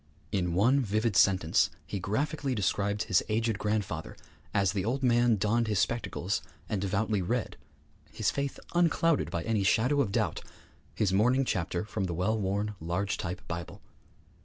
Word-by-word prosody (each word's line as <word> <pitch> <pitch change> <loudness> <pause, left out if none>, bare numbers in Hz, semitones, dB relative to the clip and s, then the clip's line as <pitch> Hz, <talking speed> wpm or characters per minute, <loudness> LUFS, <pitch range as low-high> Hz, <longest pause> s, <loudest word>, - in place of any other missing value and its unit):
In 90 -3 0
one 120 +9 +4
vivid 110 -2 0
sentence 95 -5 +4 0.2
he 100 - -4
graphically 135 - -1
described 100 0 0
his 95 -5 +3
aged 110 -1 0
grandfather 105 -7 -2 0.3
as 100 -2 +2
the 95 -1 -2
old 130 +6 -1
man 120 -2 +4
donned 110 +3 +1
his 105 -2 0
spectacles 110 -2 -1 0.3
and 105 -4 -2
devoutly 100 +1 0
read 115 +6 -2 0.6
his - - 0
faith 140 -1 -3
unclouded 165 -2 +2
by 85 - -3
any 115 -3 0
shadow 125 +9 +3
of 110 -8 -1
doubt - - 0 0.5
his 100 -3 +1
morning 125 +7 +3
chapter 90 -3 -1
from 105 -2 -3
the 85 -2 -3
well 95 +6 +1
worn, 105 +1 -1
large 90 +5 -2
type 90 0 -5
Bible. 85 0 -6
105 Hz, 160 wpm, -29 LUFS, 95-120 Hz, 0.6 s, one